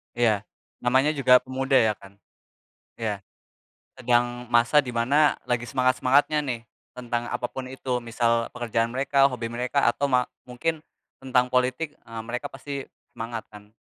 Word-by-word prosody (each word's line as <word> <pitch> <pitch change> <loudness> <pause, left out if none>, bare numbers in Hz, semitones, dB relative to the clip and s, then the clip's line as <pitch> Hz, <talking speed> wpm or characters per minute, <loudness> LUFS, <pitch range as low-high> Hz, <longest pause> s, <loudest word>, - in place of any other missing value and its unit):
Iya, 110 -3 +1 0.3
namanya 130 +4 +3
juga 130 -4 +5
pemuda, 135 +1 -1
ya, 110 -4 +5
kan. 100 0 -15 0.8
Iya, 110 -3 -3 0.8
sedang 120 0 +1
masa 120 +4 +4
di 125 - -5
mana 140 +6 +3
lagi 120 -1 0
semangat-semangatnya, 130 +4 +2
nih, 125 -4 -3 0.3
tentang 120 -1 -4
apa 120 0 -2
pun 130 +1 -6
itu, 130 -1 -3
misal 115 0 0
pekerjaan 115 -1 -1
mereka, 135 +1 +3
hobi 125 -4 0
mereka, 125 +3 +1
atau 130 +4 0
ma 125 -3 +2 0.2
mungkin 155 +6 -3 0.3
tentang 125 -1 +1
politik, 130 +5 0
eee, 115 0 -9
mereka 125 +1 -3
pasti 140 -2 -6 0.3
semangat, 115 0 -5
kan, 105 0 -15
125 Hz, 145 wpm, -25 LUFS, 120-135 Hz, 0.8 s, juga